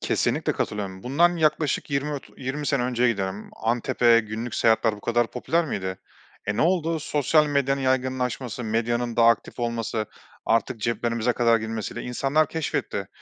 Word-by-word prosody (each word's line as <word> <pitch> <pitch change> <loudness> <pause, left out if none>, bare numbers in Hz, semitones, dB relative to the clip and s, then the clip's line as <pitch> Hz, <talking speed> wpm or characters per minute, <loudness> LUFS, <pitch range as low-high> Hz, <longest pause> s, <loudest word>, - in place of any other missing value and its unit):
Kesinlikle - - 0
katılıyorum. 95 -2 -4
Bundan 170 +7 +3
yaklaşık 155 -2 +1
20 140 +2 -1
ot 140 - -7
20 135 +3 -4
sene 140 -4 +1
önceye 125 0 +2
giderdim. 95 0 -4
Antep'e 120 0 +3
günlük 110 +2 -5
seyahatler 115 -1 +3
bu - - -13
kadar 120 +1 +1
popüler 165 +7 0
miydi? 95 -6 -3 0.5
E, 105 - -1
ne - - +2
oldu? 165 -2 +1
Sosyal 150 +1 +2
medyanın 140 -1 +1
yaygınlaşması, 130 -2 -1
medyanın 120 +2 -1
daha 115 0 +6
aktif 115 +2 0
olması, 115 -2 -2 0.4
artık 115 +1 +1
ceplerimize 115 +1 0
kadar 115 -1 +3
girmesiyle 110 -1 -4
insanlar 135 +5 +1
keşfetti. 160 -2 -3
120 Hz, 150 wpm, -25 LUFS, 115-140 Hz, 0.5 s, daha